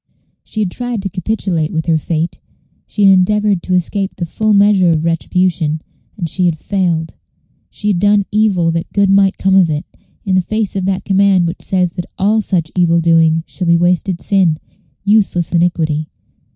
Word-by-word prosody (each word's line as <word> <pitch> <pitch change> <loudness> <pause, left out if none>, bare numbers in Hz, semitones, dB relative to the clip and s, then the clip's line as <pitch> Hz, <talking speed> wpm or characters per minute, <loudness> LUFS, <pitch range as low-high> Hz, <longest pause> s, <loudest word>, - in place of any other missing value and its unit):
She 215 - -5
had 190 -4 -1
tried 245 -3 -4
to 195 - -3
capitulate 185 -4 -2
with 160 -1 -2
her 160 -1 +1
fate; 165 +2 -3 0.5
she 210 - -2
had 195 -1 +7
endeavored 205 0 +2
to 185 - -1
escape 195 +2 -2
the 175 - -4
full 215 +6 -1
measure 200 -3 +4
of 160 -1 0
retribution, 165 -1 0 0.4
and 175 -4 -3
she 180 +3 -1
had 165 -2 -1
failed. 170 -3 -2 0.6
She 210 - -4
had 190 -4 +1
done 205 +1 +3
evil 200 -6 +2
that 165 +1 -4
good 200 -1 +2
might 195 -1 +3
come 190 0 +1
of 190 -3 +4
it, 150 0 -3 0.4
in 195 - -1
the 185 - +3
face 215 +2 -3
of 190 -2 -2
that 190 -1 -2
command 195 -2 +3
which 170 - -4
says 180 -2 -1
that 175 -3 -6
all 215 +3 +2
such 170 -6 -1
evil 170 -2 +3
doing 165 -1 +3
shall 180 - -5
be 170 0 +4
wasted 175 +1 0
sin, 185 -6 +2 0.5
useless 200 -5 +1
iniquity. 165 -3 0
185 Hz, 185 wpm, -15 LUFS, 170-200 Hz, 0.6 s, had